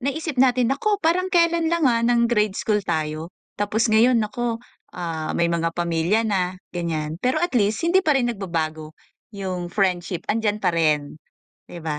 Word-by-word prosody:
naisip 280 +2 -3
natin 250 -2 +3
naku 415 +10 0
parang 360 +2 +1
kelan 335 -2 +3
lang, 340 -1 +1
ah, 230 -1 +2
ng 235 0 +3
grade 210 -4 +1
school 210 -1 0
tayo, 155 0 -2 0.3
tapos 215 +3 +1
ngayon 235 +3 +5
naku, 230 +1 -1 0.4
ah, 165 -3 -3
may 170 - +2
mga 165 0 0
pamilya 170 +4 +1
na 185 -3 -1 0.2
ganyan. 160 -3 -3
Pero 255 +1 +1
at 350 - 0
least 210 -1 +1
hindi 355 +3 +4
pa 300 -3 +3
rin 245 -2 +1
nagbabago 160 -6 -4 0.4
yung 185 -3 -4
friendship 180 -2 -1
andiyan 215 -1 0
pa - - +2
rin 150 -3 0 0.5
di 170 - -10
ba? 155 -2 -3
205 Hz, 170 wpm, -22 LUFS, 170-250 Hz, 0.5 s, ngayon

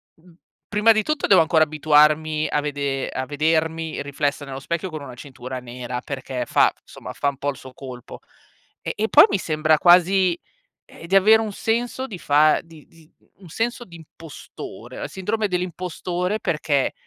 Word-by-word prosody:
mhmm, 170 +2 -22 0.3
prima 210 +2 +4
di 215 -1 +2
tutto 305 +2 -1
devo 190 - +6
ancora 160 0 +3
abituarmi 155 0 +2
a - - +1
vede 140 -2 -3
a 130 - -4
vedermi 160 +1 -1
riflessa 145 +1 -2
nello 135 -1 -7
specchio 170 +6 -3
con 155 -2 -7
una 130 - -9
cintura 130 0 -8
nera 125 0 -6
perché 130 -3 -5
fa - - +3
f - - -33
insomma - - -10
fa 140 - 0
un 140 - -8
po' 145 +1 -2
il 135 - -12
suo 130 -1 -12
colpo. 130 -3 -10 0.6
Eh, - - -4
e 220 - -1
poi - - +8
mi 200 - +1
sembra 155 -3 +1
quasi, 180 +1 +4 0.5
ehm, 165 - -13
di 190 +3 +2
avere 215 +3 +6
un 215 -2 -4
senso 240 +5 -2
di 210 -8 -8
fa 150 0 +3
di 165 -3 -17
di 165 -1 -22 0.3
un 190 -3 -14
senso 235 +8 -3
di 170 - -13
impostore, 160 -1 -11
la - - -5
sindrome 210 +3 -2
dell'impostore 180 +1 -3
perché, 150 -6 0
160 Hz, 180 wpm, -22 LUFS, 145-185 Hz, 0.6 s, poi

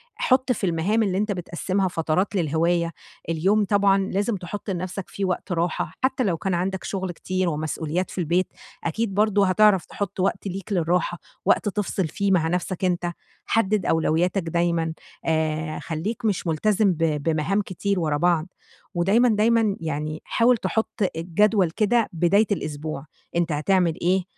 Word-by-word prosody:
حُط 255 0 +2
في 215 -5 0
المهام 180 +7 +1
اللي 190 -3 0
أنت 210 +1 0
بتقسِّمها 185 +1 -1
فترات 175 +3 0
للهواية. 170 0 +1 0.4
اليوم 195 +6 +2
طبعًا 200 -1 +3
لازم 200 +3 0
تحُط 195 +3 -6
لنَفسك 185 +1 -4
فيه 200 - -3
وقت 185 +1 -2
راحة، 170 -1 -1
حتى 260 0 +2
لو 185 -7 0
كان 190 +3 -2
عندك 185 +2 -1
شغل 190 -2 -3
كتير 185 +1 -1
ومسؤوليات 155 +3 -2
في - - -10
البيت، 175 +1 +1 0.4
أكيد 195 +5 -1
برضو 205 0 +3
هتعرَف 195 0 +4
تحط 200 -2 -5
وقت 195 +2 0
ليك 195 +2 -6
للراحة، 175 -1 0 0.3
وقت 205 - +3
تِفصِل 195 -3 -1
فيه 200 +5 -1
مع 170 -4 +3
نَفْسك 180 +2 -1
أنت، 175 -1 0 0.3
حدد 210 -4 +1
أولوياتك 170 +4 +1
دايمًا، 170 -1 0 0.3
آآ، 155 -1 0
خلّيك 210 +10 -4
مش 200 -4 0
ملتزم 200 +5 +2
ب - - -8 0.3
بمهام 165 +6 +1
كتير 200 0 -2
وراء 155 -3 0
بعض، 170 -1 +2 0.5
ودايمًا، 200 +8 +3
دايمًا 220 -1 +3
يعني 155 -1 -3
حاول 240 +1 +3
تحط 220 -1 -1
الجدول 180 +2 +2
كده 220 +5 +2
بداية 185 +6 +3
الأسبوع، 155 -5 -3 0.3
أنت 170 -1 +1
هتعمل 170 +2 +2
إيه، 185 +2 +2
185 Hz, 155 wpm, -24 LUFS, 165-205 Hz, 0.5 s, هتعرَف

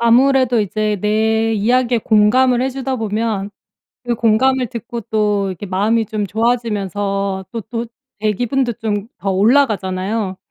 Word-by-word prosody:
아무래도 250 0 +4
이제 210 +1 -1
내 220 +2 +1
이야기에 240 +3 +2
공감을 240 +4 +3
해 265 - 0
주다 265 0 -3
보면 215 -2 -2 0.5
그 240 -1 0
공감을 245 +3 +2
듣고 235 -1 -6
또 210 -2 0
이렇게 190 +2 -6
마음이 215 +4 +1
좀 210 -1 -3
좋아지면서 200 -4 -1
또 230 -2 -4
또 235 +2 -5 0.3
제 215 0 +1
기분도 245 +3 0
좀 210 -1 -2
더 195 - -4
올라가잖아요. 200 -3 +1
220 Hz, 295 characters per minute, -18 LUFS, 205-240 Hz, 0.5 s, 아무래도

